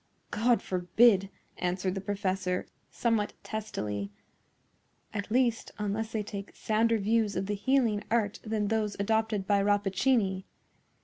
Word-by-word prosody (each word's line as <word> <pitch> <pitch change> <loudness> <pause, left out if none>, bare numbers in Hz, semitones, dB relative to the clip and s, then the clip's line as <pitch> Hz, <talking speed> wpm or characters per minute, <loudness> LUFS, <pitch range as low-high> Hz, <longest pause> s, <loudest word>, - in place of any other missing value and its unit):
"God 235 +3 +2
forbid," 190 +2 +3 0.3
answered 180 +1 -1
the 195 - -4
professor, 190 -2 -1 0.2
somewhat 225 -3 0
testily; 105 - -4 1.0
"at 205 0 -3
least, 235 -1 +1
unless 210 +1 -2
they 215 -2 -1
take 200 -1 -7
sounder 225 +1 +2
views 215 -1 +1
of 190 - -1
the 205 - -2
healing 225 -1 +1
art 215 -2 +1
than 215 -2 -1
those 215 -2 0
adopted 220 -1 +1
by 200 0 +3
Rappaccini. 200 0 +2
205 Hz, 125 wpm, -29 LUFS, 195-225 Hz, 1.0 s, forbid